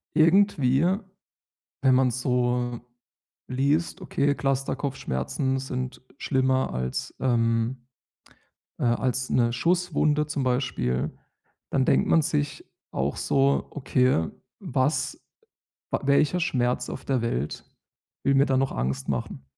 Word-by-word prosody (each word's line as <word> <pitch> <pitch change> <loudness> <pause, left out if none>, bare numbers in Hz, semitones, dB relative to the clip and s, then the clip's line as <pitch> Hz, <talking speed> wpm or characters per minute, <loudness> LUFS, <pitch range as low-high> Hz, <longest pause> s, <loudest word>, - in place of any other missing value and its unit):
irgendwie, 160 -4 +4 1.0
wenn 130 -1 +5
man 130 0 +4
so 125 -1 0 0.7
liest, 145 +8 0
okay, 145 -5 0
Cluster-Kopfschmerzen 135 - -1
sind 130 -1 -4 0.2
schlimmer 130 -1 +1
als 65 0 -3
ähm, 120 0 +1 0.9
äh, - - -2
als 125 +2 0
'ne 120 -1 +2
Schusswunde 155 0 +1
zum 150 -3 -2
Beispiel, 125 - 0 0.6
dann 135 -2 +1
denkt - - +3
man 165 - +5
sich 145 -1 -2 0.3
auch 70 +2 -1
so: 140 0 +2
„Okay, 125 - +1 0.3
was 130 +4 -1 0.7
w - - +2
welcher 140 +5 +3
Schmerz 125 -6 0
auf 130 - -7
der 130 -4 0
Welt 75 - -2 0.6
will 140 - +3
mir 135 +1 +5
da 135 - +1
noch 135 0 +1
Angst 65 +2 -2
machen?” 70 0 -3
130 Hz, 115 wpm, -26 LUFS, 120-140 Hz, 1.0 s, wenn